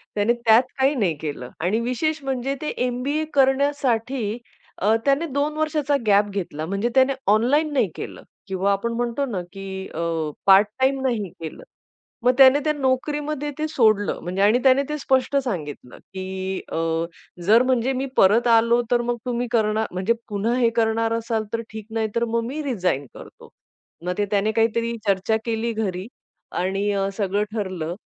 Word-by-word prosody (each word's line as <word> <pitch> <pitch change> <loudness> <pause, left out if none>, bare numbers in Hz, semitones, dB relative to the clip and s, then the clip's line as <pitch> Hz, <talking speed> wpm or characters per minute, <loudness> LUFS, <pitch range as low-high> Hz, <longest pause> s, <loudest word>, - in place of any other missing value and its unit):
त्याने 210 +3 +2
त्यात 235 0 +4 0.2
काही 270 +2 +3
नाही 195 -9 +1
केलं 145 -5 -5
आणि 185 +7 +1
विशेष 280 +6 -1
म्हणजे 270 0 -2
ते 305 - -3 0.2
एम-बी-ए 265 +5 -1
करण्यासाठी 265 -5 +1 0.4
अ, 210 +4 +3
त्याने 280 +4 +2
2 290 0 -1
वर्षाचा 300 -2 0
गॅप 205 0 +5
घेतला. 175 -6 -4
म्हणजे 200 +7 -1
त्याने 265 +1 +5 0.2
ऑनलाईन 275 +9 +3
नाही 230 -8 +2
केलं - - -7 0.3
किंवा 190 +1 0
आपण 200 +4 -1
म्हणतो 240 +3 -1
ना, 210 -9 -3
की 190 -1 -6
अ, 165 - -2 0.4
पार्ट 195 +1 +7
टाईम 265 +1 +2
नाही 230 -7 -1
केलं. 160 -1 -8 0.6
मग 250 - +5
त्याने 270 +1 +7
त्या 305 - +1
नोकरीमध्ये 295 +2 -1
ते 310 0 -1
सोडलं 215 -7 +2
म्हणजे 185 +3 -2
आणि 210 +5 +4
त्याने 270 +1 +5
ते 300 - -2
स्पष्ट 265 -1 +1
सांगितलं, 150 - -5
की 190 0 -5
अ, - - -1 0.7
"जर 225 +5 +6
म्हणजे 255 0 +1
मी 265 +1 -2
परत 220 +6 +5
आलो 230 +1 +4
तर 240 -1 +3
मग 240 0 -2
तुम्ही 245 0 -1
करणार 220 -2 +1
म्हणजे 185 +5 +1 0.2
पुन्हा 210 +3 0
हे 240 -2 +3
करणार 225 0 +1
असाल 230 -1 -1
तर 230 - 0
ठीक 220 -1 -7
नाही 220 -1 0
तर 235 0 +2
मग 230 0 +1
मी 290 +5 -4
रिझाइन 185 - -1
करतो." - - -13 0.6
मग 180 - 0
ते 205 - +1
त्याने 205 +1 +2
काहीतरी 230 +1 +1
चर्चा 200 +3 +2
केली 230 0 -1
घरी 195 -3 -3 0.4
आणि 195 +3 -1 0.3
सगळं 205 0 0
ठरलं. 185 -6 -3
230 Hz, 165 wpm, -23 LUFS, 200-265 Hz, 0.7 s, पार्ट